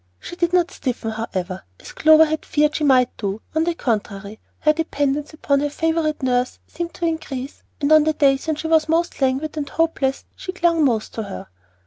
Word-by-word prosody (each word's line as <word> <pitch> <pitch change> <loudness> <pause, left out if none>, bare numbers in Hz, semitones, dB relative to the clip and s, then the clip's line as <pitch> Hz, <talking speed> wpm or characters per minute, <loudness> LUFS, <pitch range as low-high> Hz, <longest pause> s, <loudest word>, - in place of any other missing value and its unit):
She 350 - -8
did 345 -1 0
not 360 0 +2
"stiffen," 240 -4 -3
however, 190 -4 -4 0.2
as - - -11
Clover 315 +1 +6
had 315 0 -3
feared 300 0 +1
she 310 - -1
might 255 -3 +4
do; 200 0 -3
on 315 +1 +1
the 345 -1 0
contrary, 210 -5 -3 0.2
her 305 - +4
dependence 295 -2 -1
upon 285 -3 0
her 290 +1 0
favorite 320 -1 -1
nurse 250 -1 0
seemed 345 -1 -6
to 345 - -3
increase, 285 -5 -4 0.2
and 290 0 0
on 310 -1 +7
the 315 - +2
days 275 -1 +2
when 315 - +1
she 310 - -7
was 320 -1 +3
most 335 -1 0
languid 270 +4 0
and 285 -2 -3
hopeless 295 -5 0
she 370 - -6
clung 340 -3 +2
most 230 -6 0
to 225 - -3
her. 195 - -8
295 Hz, 200 wpm, -21 LUFS, 255-320 Hz, 0.2 s, on